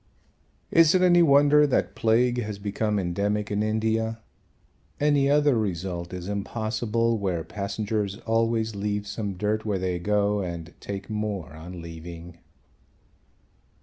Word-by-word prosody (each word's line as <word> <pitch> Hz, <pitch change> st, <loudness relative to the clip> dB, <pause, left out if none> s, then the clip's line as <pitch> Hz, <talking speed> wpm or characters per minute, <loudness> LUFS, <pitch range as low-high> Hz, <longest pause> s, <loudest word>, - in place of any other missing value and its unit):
Is 165 Hz, +1 st, +6 dB
it 185 Hz, -, +4 dB
any 175 Hz, -1 st, +6 dB
wonder 145 Hz, -1 st, +6 dB
that 135 Hz, -, 0 dB
plague 120 Hz, +2 st, +2 dB
has 105 Hz, -2 st, -5 dB
become 105 Hz, +1 st, -1 dB
endemic 100 Hz, +3 st, -1 dB
in 105 Hz, 0 st, 0 dB
India? 110 Hz, +1 st, 0 dB, 0.8 s
Any 145 Hz, -2 st, +3 dB
other 145 Hz, -2 st, +4 dB
result 90 Hz, -4 st, -3 dB
is 90 Hz, -1 st, -6 dB
impossible 110 Hz, +2 st, -1 dB
where 90 Hz, -5 st, -1 dB
passengers 100 Hz, +1 st, -3 dB
always 115 Hz, -1 st, +1 dB
leave 105 Hz, 0 st, -2 dB
some 105 Hz, -1 st, -4 dB
dirt 105 Hz, +3 st, -1 dB
where 105 Hz, -3 st, -1 dB
they 90 Hz, -1 st, -2 dB
go 105 Hz, +2 st, +1 dB
and 85 Hz, -2 st, -6 dB
take 100 Hz, -1 st, -6 dB
more 105 Hz, -7 st, -3 dB
on 85 Hz, +2 st, -9 dB
leaving. 85 Hz, +1 st, -9 dB
105 Hz, 130 wpm, -26 LUFS, 95-115 Hz, 0.8 s, Is